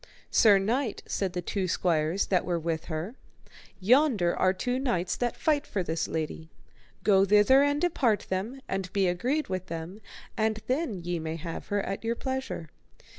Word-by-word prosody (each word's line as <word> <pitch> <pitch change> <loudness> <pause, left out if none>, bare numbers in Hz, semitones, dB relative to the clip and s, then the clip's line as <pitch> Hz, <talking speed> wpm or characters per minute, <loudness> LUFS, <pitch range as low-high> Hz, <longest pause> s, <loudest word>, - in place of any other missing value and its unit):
Sir 210 -3 +6
knight, 225 +4 -1
said 190 -3 -2
the 180 -1 -3
two 190 +1 -2
squires 170 +1 +1
that 185 -2 +1
were 175 -1 -1
with 165 0 -2
her, 165 +6 -4 0.7
yonder 225 - +3
are 185 - +3
two 245 +7 -2
knights 185 -10 0
that 240 -2 -2
fight 300 -2 +1
for 190 - -2
this 165 -1 -2
lady, 160 0 -4 0.5
go 195 -2 +5
thither 210 +7 +5
and 285 0 +2
depart 270 -11 +1
them, 215 +9 -3
and 190 -1 -3
be 195 -2 +2
agreed 250 - 0
with 185 -1 -4
them, 170 +5 -6 0.3
and 220 0 0
then 255 - -1
may 170 -2 -3
ye - - -4
have 165 0 -6
her 205 -1 0
at 195 - -4
your 230 +1 0
pleasure. 260 - -4
195 Hz, 175 wpm, -28 LUFS, 175-245 Hz, 0.7 s, Sir